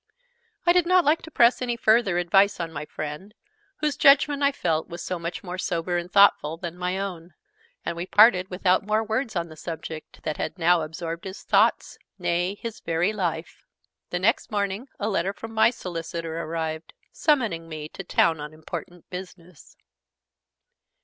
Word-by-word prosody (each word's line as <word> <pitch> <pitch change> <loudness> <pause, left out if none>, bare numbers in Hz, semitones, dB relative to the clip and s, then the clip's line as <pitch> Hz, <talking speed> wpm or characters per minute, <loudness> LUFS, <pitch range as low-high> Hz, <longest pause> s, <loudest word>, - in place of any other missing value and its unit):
I 345 - +6
did 355 -1 +3
not 365 -1 +4
like 305 +3 +3
to - - -10
press 240 -5 +4
any 245 -1 -1
further 220 -5 +3
advice 195 +3 +3
on 165 -1 -3
my 150 0 -5
friend, 155 +9 -7 0.5
whose 300 -1 +1
judgment, 280 +1 +5
I 280 0 +4
felt, 160 - -1
was 170 0 -7
so 180 -2 -3
much 170 +1 -5
more 180 -1 -6
sober 175 0 -1
and 175 +1 -3
thoughtful 175 -6 +4
than 170 0 -6
my 180 +1 -2
own; 180 -4 -6 0.5
and 170 - -2
we 170 +2 -5
parted 200 -3 +5
without 185 0 +2
more 215 +2 +1
words 220 +1 -2
on 170 -1 -2
the 155 - -11
subject 160 -1 -8
that 155 - -3
had - - -4
now 175 0 +4
absorbed 165 +2 -5
his 190 0 -8
thoughts, - - +2 0.2
nay, 175 +3 0
his 230 +1 -7
very 170 +5 0
life. 175 -5 -3 0.5
The 175 - -2
next 215 +8 +1
morning 205 +2 -2
a 205 - -1
letter 195 -2 0
from 225 +2 -9
my 220 +1 +5
solicitor 165 -6 -5
arrived, 160 -1 -4 0.2
summoning 225 - 0
me 155 -1 -6
to 195 - -8
town 165 -3 +2
on 150 +1 -7
important 165 +2 -8
business. 180 -2 -10
180 Hz, 175 wpm, -25 LUFS, 165-215 Hz, 0.5 s, I